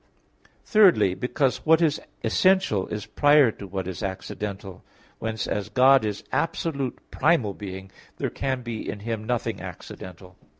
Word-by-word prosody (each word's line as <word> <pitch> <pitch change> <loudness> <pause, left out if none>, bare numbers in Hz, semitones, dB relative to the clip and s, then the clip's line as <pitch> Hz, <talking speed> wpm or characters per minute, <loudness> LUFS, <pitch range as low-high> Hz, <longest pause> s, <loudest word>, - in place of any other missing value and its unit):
Thirdly, 195 - +5
because 125 +5 -1
what 160 0 +5
is 160 -3 +1 0.2
essential 115 - +2
is 105 -1 -5
prior 145 +3 +4
to 100 - -10
what 95 -1 -4
is 95 -2 -5
accidental. 95 0 -5 0.4
Whence 110 -1 -3
as 105 -1 -3
God 135 0 +5
is 105 -1 -3
absolute 140 -2 -1
primal 140 -11 +2
being, 95 -1 -8 0.3
there - - -2
can 130 -2 -2
be 115 -2 -5
in 105 - -5
Him 110 0 -3
nothing 120 +1 -2
accidental. 90 0 -10
110 Hz, 140 wpm, -25 LUFS, 100-140 Hz, 0.4 s, Thirdly